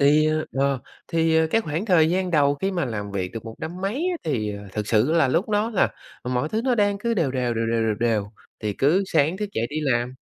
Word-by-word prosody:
Thì, 150 +2 +5 0.2
ờ, 135 0 +1 0.3
thì 160 -1 +3
cái 225 - +2
khoảng 165 0 -3
thời 165 -5 +4
gian 185 +1 0
đầu 145 -3 +3
khi 190 +7 -2
mà 175 -5 -1
làm 105 -4 -4
việc 95 -2 -3
được 115 -1 -7
một 115 -1 -7
năm 175 +3 -6
mấy 195 +3 -1 0.2
á - - -2
thì 110 -9 -1 0.2
thực 105 0 -3
sự 115 +8 +3
là 160 -6 +4
lúc 170 - +1
đó 210 +2 +1
là 210 - +2 0.3
mọi 125 +3 -1
thứ 215 +6 -1
nó 255 -2 +3
đang 205 -2 +2
cứ 235 +3 -1
đều 165 -10 +1
đều, 125 -2 -1
đều 115 0 -1
đều, 115 0 +1
đều 110 - +1
đều, 110 -4 +1 0.3
thì 105 -2 -2
cứ 155 - +2
sáng 160 +2 +2
thức 210 +1 -3
dậy 115 - -1
đi 150 - -5
làm. 125 -3 0
150 Hz, 245 wpm, -24 LUFS, 120-180 Hz, 0.3 s, Thì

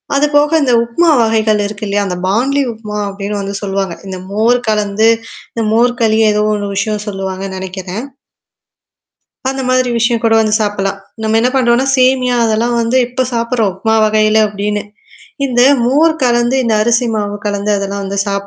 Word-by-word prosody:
அதுபோக 295 +2 +3
இந்த 250 -3 +2
உப்மா 330 +9 +1
வகைகள் 220 -2 +1
இருக்கு 210 0 -7
இல்லையா? 200 0 0
அந்த 180 - -3
பான்லி 265 +8 +1
உப்மா 210 -1 -7
அப்படின்னு 200 +1 -5
வந்து 200 0 -5
சொல்லுவாங்க. 195 -3 -2
இந்த 190 - -5
மோர் 230 +4 +2
கலந்து 210 +1 +1 0.5
இந்த 230 - -2
மோர் 245 +2 +2
களியோ 220 -1 +3
ஏதோ 210 0 +1
ஒண்ணு 205 -1 -2
விஷயம் 210 +1 -2
சொல்லுவாங்கன்னு 190 -1 -5
நெனைக்கிறேன். 190 +4 -6 1.4
அந்த 270 0 -3
மாதிரி 255 -1 +2
விஷயம் 235 0 +1
கூட 225 - +3
வந்து 215 -1 +1
சாப்பிடலாம். 195 -1 -2 0.2
நம்ம 220 +1 +1
என்ன 245 - +2
பண்ணறோம்ன்னா, 250 +1 +2
சேமியா 255 -1 +2
அதெல்லாம் 230 +2 0
வந்து 230 +3 +1
இப்ப 255 +1 -2
சாப்படுறோம். 230 -4 0
உமா 220 0 +2
வகையில 215 0 +3
அப்படின்னு. 205 0 -3 0.7
இந்த 245 -1 +2 0.2
மோர் 310 +6 +3
கலந்து, 240 +1 +2
இந்த 225 -2 +1
அரிசி 235 +2 +1
மாவு 205 -1 -2
கலந்து 205 0 -1
அதெல்லாம் 200 0 -3
வந்து 200 +1 -4
சாப்ப 200 0 -2
220 Hz, 165 wpm, -14 LUFS, 200-245 Hz, 1.4 s, அதுபோக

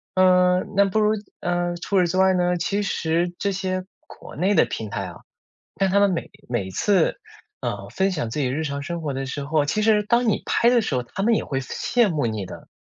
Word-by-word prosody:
嗯， 180 0 +4
那 200 0 +5
不 195 +2 0
如 210 0 +3 0.3
嗯， 175 0 -1
除 190 +3 0
此 180 - +3
之 180 +2 -2
外 190 0 +5
呢， 180 -1 +1
其 200 +4 -1
实 170 -2 0
这 200 - 0
些 185 -1 -2 0.2
国 - - -12
内 190 +6 +1
的 160 - +5
平 110 -2 -5
台 100 -1 -3
啊 - - -8 0.6
但 195 -1 +1
他 200 - +3
们 200 -1 +4
每 170 - -3 0.2
每 120 -6 -1
一 - - -7
次， 195 - +2 0.4
呃， - - -4
分 190 0 0
享 150 -10 -3
自 135 - -4
己 135 - +1
日 140 +5 -2
常 140 -1 -3
生 170 +3 -4
活 150 -3 -2
的 135 0 -3
时 140 +2 -4
候 150 +1 +1
其 215 +9 0
实 215 -1 +4
当 235 +2 +2
你 215 - +1
拍 235 - +3
的 245 -1 +4
时 160 - -2
候， 125 - 0
他 120 +10 -6
们 230 +3 +3
也 - - 0
会 135 -1 -2
羡 230 - +1
慕 150 -7 0
你 110 -4 -3
的。 - - -11
180 Hz, 260 characters per minute, -23 LUFS, 145-195 Hz, 0.6 s, 那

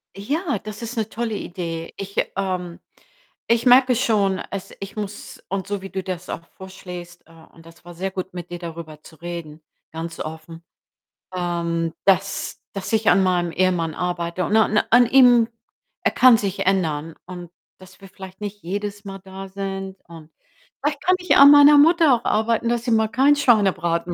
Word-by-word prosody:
Ja, 280 - -2
das 210 +2 -9
ist 235 +1 -6
'ne 220 -2 -1
tolle 225 -1 -3
Idee. 165 -4 -6
Ich, 200 0 -7 0.2
ähm 185 -3 -3 0.7
ich 235 +1 +2
merke 250 0 +6
schon, 200 -5 +1
es 200 -2 -6
ich 195 0 -8
muss 210 -1 -7
und 195 0 -3
so 200 -1 -3
wie 195 - -8
du 190 -1 -5
das 180 -1 -6
auch 165 - -6
vorschlägst, 180 -2 -10
äh, 165 - -20 0.2
und 165 - -18
das 165 +1 -17
war 175 - -10
sehr 190 +3 -3
gut, 185 -1 -6
mit 175 -1 -8
dir 175 - -6
darüber 165 -3 -9
zu 160 - -15
reden, 170 -2 -8 0.3
ganz 165 +1 -7
offen, 160 +1 -8 0.7
ähm, 170 -2 -2
dass 195 0 0
dass 195 -1 -5
ich 220 -1 +3
an 195 - +4
meinem 175 -2 +1
Ehemann 175 -3 0
arbeite 175 0 -2
und 210 - 0
an 215 -1 +3
an 245 +1 +6
ihm 245 -2 +6 0.6
er - - +2
kann 250 -3 +6
sich 200 -3 -3
ändern 165 -5 -1
und 175 -2 -9 0.3
dass 190 +1 -17
wir 195 - -12
vielleicht 190 +1 -12
nicht 205 0 -6
jedes 205 +3 -5
Mal 195 0 -7
da 195 0 -9
sind. 195 0 -6
Und 160 -2 -13 0.5
vielleicht 285 0 -2
kann 370 - +3
ich 360 - +2
an 280 +1 +9
meiner 290 0 +8
Mutter 320 -1 +5
auch 235 - -7
arbeiten, 230 +2 +1
dass 235 -1 -1
sie 245 - -1
mal 220 -1 +3
keinen 270 +5 +4
Schweinebraten 185 -9 +1
190 Hz, 180 wpm, -22 LUFS, 175-220 Hz, 0.7 s, an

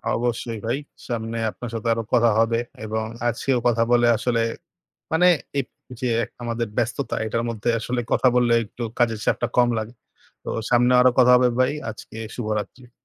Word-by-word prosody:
অবশ্যই 115 -1 -2
ভাই। 120 +4 0 0.3
সামনে 115 -1 -3
আপনার 120 - -8
সাথে 115 0 -4
আরও 115 0 -3
কথা 120 -1 +5
হবে। 115 +1 +2 0.3
এবং 110 0 -2 0.2
আজকেও 120 +2 0
কথা 115 -1 +3
বলে 120 0 +5
আসলে 120 -2 0 0.7
মানে 180 +3 +4 0.3
এই - - +1 0.4
যে 125 - -1 0.4
আমাদের 115 -1 -2
ব্যস্ততা, 120 +2 -1
এইটার 115 +1 -1
মধ্যে 115 0 -3
আসলে 120 +2 -2
কথা 130 - +4
বললে 120 -1 +3
একটু 120 +3 -9 0.2
কাজের 115 -3 +2
চাপটা 120 - +1
কম 120 -1 +5
লাগে। 110 +2 -5 0.5
তো - - -7 0.2
সামনেও 125 +1 +4
আরও 130 - +6
কথা 125 0 +6
হবে 125 0 +4
ভাই। 130 +2 +3 0.2
আজকে 110 +1 -11 0.2
শুভরাত্রি। 115 +2 -4
120 Hz, 165 wpm, -23 LUFS, 115-125 Hz, 0.7 s, আরও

